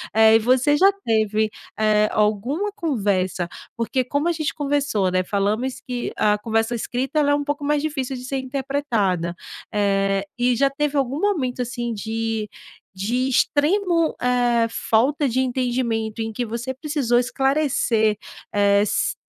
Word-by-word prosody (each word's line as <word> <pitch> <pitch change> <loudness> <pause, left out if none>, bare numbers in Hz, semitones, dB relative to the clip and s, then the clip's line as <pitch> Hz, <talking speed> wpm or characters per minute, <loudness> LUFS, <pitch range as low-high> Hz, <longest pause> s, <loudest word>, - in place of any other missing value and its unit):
Eh, 220 0 +7
e - - 0
você 255 +5 +3
já 390 +5 +6
teve, 220 -1 +1 0.3
eh, 215 -1 +3
alguma 240 - 0
conversa 200 - -1 0.3
porque 235 +3 0
como 285 +5 -1
a 345 - +1
gente 310 -2 -2
conversou, 280 -10 0
né, 185 0 +1
falamos 215 +7 -1
que 245 -1 -3
a 210 0 +3
conversa 225 +2 0
escrita 260 +6 -2
ela 290 -1 +3
é - - +4
um 290 - -1
pouco 290 0 -3
mais 295 0 +1
difícil 275 -4 -3
de 250 - -9
ser 270 +1 -2
interpretada. 255 - -1 0.4
Eh, 195 -1 +1 0.2
e 245 0 +3
já 275 +1 +3
teve 295 +1 -1
algum 270 +2 0
momento, 270 -12 0
assim, 240 -1 -3
de 220 0 -3 0.5
de 240 +7 -1
extremo, 330 +6 +2
eh, 245 -2 +2
falta 270 +7 +1
de 250 +2 0
entendimento 240 -3 -1
em 225 0 -3
que 245 +2 -2
você 235 +4 -4
precisou 265 -4 0
esclarecer, 250 -5 +1 0.4
eh, 200 0 +4
s 210 - 0
245 Hz, 150 wpm, -22 LUFS, 215-280 Hz, 0.5 s, Eh